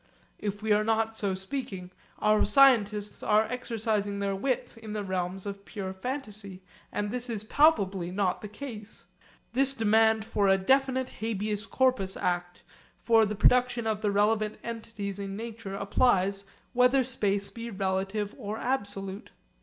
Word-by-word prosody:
If 205 0 -4
we 220 - 0
are 210 0 +4
not 225 0 +1
so 200 -3 0
speaking, 190 -3 -5 0.3
our 215 0 +3
scientists 210 -4 +4
are 215 0 +4
exercising 220 -3 -2
their 200 -1 -1
wits 250 +6 -2
in 220 -2 -8
the 210 -1 -2
realms 185 0 -3
of 200 0 -6
pure 190 -2 -5
fantasy, 205 -4 -5 0.3
and 205 0 -2
this 250 +1 -3
is 215 -3 -3
palpably 200 - +3
not 185 -1 0
the 210 - -6
case. 215 -1 -9 0.5
This 270 +2 +2
demand 220 -1 +3
for 205 -3 +1
a 195 0 +5
definite 260 +5 +2
Habeas 215 -1 -2
Corpus 255 -8 +1
Act 175 0 -2 0.4
for 225 -2 +5
the 210 - -3
production 245 +2 +3
of 215 -1 -1
the 210 - +1
relevant 210 +1 +1
entities 220 -4 -5
in 195 -1 -4
nature 220 -3 -6
applies 200 -1 +2 0.3
whether 250 +2 +4
space 205 -5 -1
be 230 0 -6
relative 195 +1 -2
or 215 -2 -4
absolute. 200 -5 -3
210 Hz, 150 wpm, -28 LUFS, 195-230 Hz, 0.5 s, a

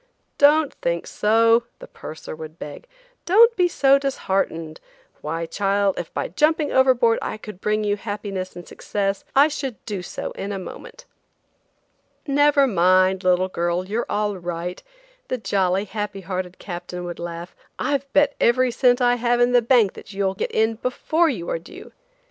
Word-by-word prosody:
"Don't 295 +1 +5
think 170 0 -1
so," 230 +2 +3
the - - -11
purser 155 0 -9
would 155 +1 -10
beg; 150 - -9 0.4
"don't 455 +6 +6
be 360 -3 +3
so 275 -5 +4
disheartened; 190 - -2 0.4
why, 165 +2 -3
child, 200 +1 0
if 170 - -6
by - - -3
jumping 300 - +1
overboard 255 -3 +4
I - - -4
could 210 -3 -11
bring 215 0 0
you 205 0 0
happiness 205 -3 -5
and 175 -1 -10
success, 200 -1 -3
I 280 +2 +7
should 275 -5 -4
do 205 -4 -4
so 180 - -6
in 200 - -5
a 200 - -3
moment." - - -10 1.2
"Never 290 0 +4
mind, 185 -2 +3
little 185 0 +3
girl, 175 0 -1
you're 220 +4 -2
all 205 -1 -1
right," 175 0 -5 0.5
the 255 - -2
jolly, 195 -3 0
happy 205 -1 -5
hearted 185 0 -5
captain 180 -1 -7
would 175 -1 -6
laugh. 170 +1 -7 0.2
"I've 280 -1 -2
bet 290 0 +3
every 250 +1 +3
cent 245 +1 +3
I 245 0 +3
have 240 0 +1
in 245 0 +4
the 245 -1 +5
bank 230 -4 +3
that - - -12
you'll 195 -1 0
get 195 - -3
in 220 0 +1
before 315 +6 +1
you 180 - -4
are - - -1
due. 165 - -13
205 Hz, 165 wpm, -22 LUFS, 185-255 Hz, 1.2 s, I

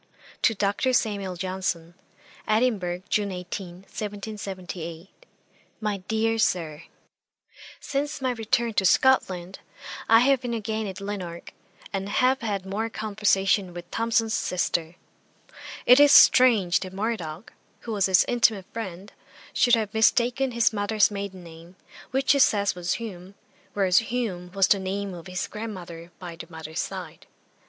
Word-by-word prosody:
'To 225 - +3
DR. 205 +6 0
SAMUEL 200 -6 0
JOHNSON. 180 -2 -3 0.5
'Edinburgh, 215 -6 0
June 205 -2 0
18, 180 0 -7
1778. 195 - -7 0.5
'MY 210 -2 -1
DEAR 225 +1 0
SIR, 165 -7 0 1.0
'Since 290 +2 -3
my 260 -1 0
return 235 0 0
to 195 - +1
Scotland, 190 -4 +2 0.5
I 225 +1 +7
have 270 0 +3
been 240 -2 -3
again 220 0 -3
at 190 0 -7
Lanark, 185 -4 -6 0.4
and 195 0 -3
have 255 +5 +2
had 200 -4 -3
more 210 +4 -2
conversation 200 -4 0
with 175 0 -9
Thomson's 225 -1 +1
sister. 170 -4 -1 0.9
It 250 +2 +7
is 290 -1 +7
strange 225 -12 +6
that 185 -1 -7
Murdoch, 195 -4 -4 0.3
who 230 - -6
was 200 -3 +2
his 190 -1 +5
intimate 225 -5 +2
friend, 195 -3 -7 0.4
should 245 -1 +4
have 215 -1 -3
mistaken 245 +3 +2
his 230 -1 +2
mother's 210 +1 +2
maiden 200 -2 -6
name, 165 +2 -13 0.3
which 265 0 +1
he 280 - +3
says 205 -6 +3
was 180 0 -2
Hume, 195 -4 -7 0.4
whereas 190 -2 +4
Hume 220 -7 -3
was 195 -1 +3
the 200 - +4
name 195 +1 -3
of 175 0 -10
his 185 0 -3
grandmother 180 -6 -8
by 175 -2 -8
the 165 - -10
mother's 160 -1 -7
side. - - -6
200 Hz, 140 wpm, -25 LUFS, 180-225 Hz, 1.0 s, I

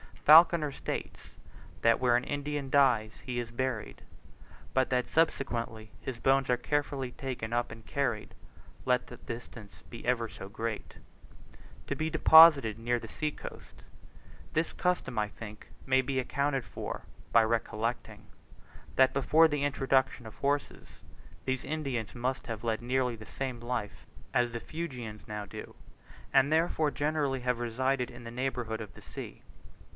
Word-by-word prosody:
Falconer 160 -1 +7
states, - - -6 0.4
that 115 0 +4
where 125 -2 +3
an 120 - +2
Indian 145 0 -3
dies 115 - +3
he 125 -1 -3
is 120 -2 -3
buried, 125 -2 -3 0.7
but 130 -1 +2
that 125 -1 +1
subsequently 115 -8 0
his 130 -3 -5
bones 135 +2 +2
are 125 - +3
carefully 140 -1 -1
taken 125 -4 -5
up 120 0 0
and 115 -1 -11
carried, 125 -7 -2 0.5
let 125 -1 +2
the 125 - -10
distance 115 -3 -9
be 115 - -9
ever 120 -2 +1
so 95 - -9
great, 110 +2 -5 0.9
to - - -2
be 155 0 -1
deposited 155 -8 +7
near 120 +1 +1
the - - -8
sea 155 - -2
coast. - - -11 0.7
This 160 +1 +1
custom, 180 -10 0
I 105 - +1
think, 105 0 -10 0.2
may 130 0 +4
be 130 +1 -3
accounted 135 +1 0
for - - -6 0.3
by 115 - +7
recollecting, 115 +1 -2 0.7
that 130 0 +5
before 155 +4 +5
the 150 -1 -1
introduction 135 -3 +1
of 110 - -10
horses, 140 +1 -2 0.4
these 130 -1 -1
Indians 135 -10 -3
must 130 +3 -2
have 115 -2 -5
led 115 -1 -1
nearly 125 -1 0
the 110 - -11
same 130 -3 -4
life 120 -4 -4 0.3
as 120 -1 +2
the 120 - -4
Fuegians 125 -10 -6
now 105 -1 -4
do, 100 - -9 0.6
and 135 +2 +5
therefore 160 -1 +2
generally 145 -3 -1
have 125 -1 0
resided 125 +2 0
in 120 0 -11
the 115 - -7
neighbourhood 120 -3 -2
of 105 -3 -8
the - - -14
sea. - - -9
125 Hz, 150 wpm, -30 LUFS, 115-140 Hz, 0.9 s, Falconer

